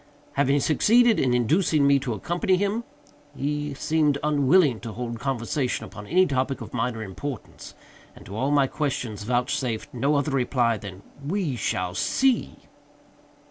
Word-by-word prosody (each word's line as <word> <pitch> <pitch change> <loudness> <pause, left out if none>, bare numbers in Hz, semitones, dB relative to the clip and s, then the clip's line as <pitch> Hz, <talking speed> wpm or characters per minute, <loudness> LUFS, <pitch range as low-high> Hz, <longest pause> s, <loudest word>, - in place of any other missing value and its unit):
Having 140 0 +2
succeeded 230 - +4
in 130 - +2
inducing 150 - +2
me 140 0 +5
to 130 -3 -3
accompany 175 - 0
him, 205 +4 -1 0.5
he 145 0 -2
seemed 150 -1 +1
unwilling 145 -2 +3
to 115 - -7
hold 120 0 -5
conversation 130 +1 -2
upon 105 0 -10
any 185 +1 +4
topic 135 -3 -1
of - - -9
minor 115 -2 -2
importance, 115 +6 -7 0.4
and - - -14
to 100 - -8
all 130 +5 0
my 145 -1 +4
questions 130 -7 -3
vouchsafed 125 +2 -2
no 140 +5 +1
other 145 +1 0
reply 125 -3 +1
than 100 -2 -9 0.2
"we 165 -2 -1
shall 90 -4 -2
see!" 260 - +1
135 Hz, 145 wpm, -25 LUFS, 120-150 Hz, 0.5 s, me